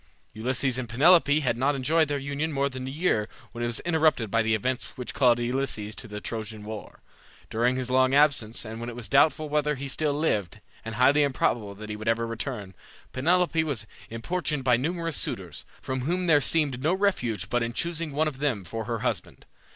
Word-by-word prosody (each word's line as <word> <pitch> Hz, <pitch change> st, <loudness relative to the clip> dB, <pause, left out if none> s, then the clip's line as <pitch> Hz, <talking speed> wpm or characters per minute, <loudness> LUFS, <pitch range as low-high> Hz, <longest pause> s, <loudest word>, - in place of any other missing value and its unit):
Ulysses 130 Hz, +3 st, 0 dB
and 120 Hz, -3 st, -5 dB
Penelope 150 Hz, +4 st, +5 dB
had 120 Hz, -4 st, 0 dB
not 140 Hz, +3 st, +2 dB
enjoyed 155 Hz, +4 st, +2 dB
their 145 Hz, 0 st, -1 dB
union 140 Hz, +3 st, -3 dB
more 140 Hz, -1 st, 0 dB
than 130 Hz, -1 st, -6 dB
a -, -, -3 dB
year 135 Hz, -8 st, 0 dB, 0.2 s
when 120 Hz, +1 st, -5 dB
it -, -, +1 dB
was 120 Hz, -, 0 dB
interrupted 155 Hz, -, +2 dB
by 115 Hz, -, +3 dB
the 110 Hz, 0 st, +2 dB
events 125 Hz, +5 st, -3 dB
which 125 Hz, -, -5 dB
called 125 Hz, -3 st, +4 dB
Ulysses 120 Hz, -4 st, -2 dB
to -, -, -9 dB
the 105 Hz, 0 st, -6 dB
Trojan 110 Hz, -1 st, -5 dB
war. 110 Hz, 0 st, -9 dB, 0.5 s
During 120 Hz, +3 st, +2 dB
his 130 Hz, -1 st, -3 dB
long 130 Hz, +1 st, +4 dB
absence, 135 Hz, -7 st, +2 dB
and 110 Hz, +1 st, -7 dB
when 120 Hz, +1 st, -5 dB
it 120 Hz, -, -8 dB
was 120 Hz, -3 st, -5 dB
doubtful 155 Hz, +6 st, +3 dB
whether 150 Hz, 0 st, +1 dB
he 140 Hz, +1 st, -5 dB
still 145 Hz, +2 st, 0 dB
lived, 105 Hz, -, -1 dB, 0.2 s
and 115 Hz, -1 st, -6 dB
highly 135 Hz, +5 st, +5 dB
improbable 120 Hz, -7 st, 0 dB
that 105 Hz, +1 st, -8 dB
he -, -, -3 dB
would 110 Hz, +1 st, -7 dB
ever 115 Hz, +1 st, +2 dB
return, 115 Hz, -4 st, -5 dB, 0.4 s
Penelope 165 Hz, +4 st, +2 dB
was 140 Hz, -9 st, -3 dB, 0.2 s
importuned 150 Hz, +5 st, -2 dB
by 125 Hz, -2 st, +4 dB
numerous 165 Hz, +5 st, -1 dB
suitors, 85 Hz, -9 st, -4 dB, 0.2 s
from 130 Hz, 0 st, -2 dB
whom 175 Hz, +7 st, -1 dB
there 150 Hz, -4 st, +5 dB
seemed 140 Hz, -5 st, +1 dB
no 160 Hz, +6 st, +2 dB
refuge 125 Hz, -, 0 dB
but 120 Hz, +3 st, 0 dB
in 115 Hz, 0 st, -1 dB
choosing 165 Hz, +3 st, -2 dB
one 155 Hz, +3 st, +1 dB
of 140 Hz, -4 st, -5 dB
them 130 Hz, -9 st, 0 dB
for 115 Hz, +4 st, -5 dB
her 115 Hz, -1 st, -3 dB
husband. -, -, -3 dB
130 Hz, 205 wpm, -26 LUFS, 115-150 Hz, 0.5 s, Penelope